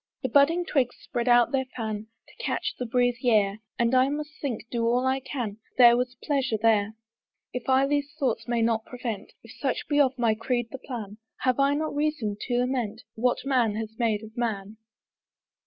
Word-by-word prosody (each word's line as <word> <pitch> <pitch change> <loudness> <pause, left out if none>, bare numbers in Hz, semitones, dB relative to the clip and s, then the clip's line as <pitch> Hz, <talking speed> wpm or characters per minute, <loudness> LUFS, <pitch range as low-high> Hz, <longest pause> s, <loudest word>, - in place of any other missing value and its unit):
The 260 - 0
budding 305 +7 +4
twigs 255 -7 +1
spread 240 -3 -3
out 240 -1 +5
their 265 -2 0
fan, 220 -2 -3 0.2
To - - -12
catch - - -1
the 250 - -2
breezy 245 +1 +1
air; 205 -2 +3 0.2
And 235 +1 +2
I 260 +1 +5
must 295 +1 -4
think, 245 -5 -3
do 235 -1 -1
all 245 +2 +2
I 260 +1 +2
can, 245 -6 -4
That - - -38
there 240 -1 +8
was 250 +1 -2
pleasure 270 -6 0
there. 215 -1 +2 0.6
If 250 +1 -4
I 265 +1 +5
these 285 0 0
thoughts 240 -6 -1
may 235 -1 +1
not 225 -1 +1
prevent, 240 -5 -6
If 230 - -13
such 270 +2 -2
be 290 -1 +2
of 265 -2 +3
my 235 -3 +3
creed 240 +1 -2
the 265 - -6
plan, 220 -6 -7 0.2
Have 255 0 +1
I 280 +1 +4
not 310 0 -2
reason 290 -8 -1
to 245 -1 +1
lament 245 -3 -1
What 245 +3 0
man 245 -6 +2
has 220 0 -4
made 220 -3 +1
of 220 +1 -11
man? 220 -3 -3
245 Hz, 200 wpm, -27 LUFS, 225-265 Hz, 0.6 s, there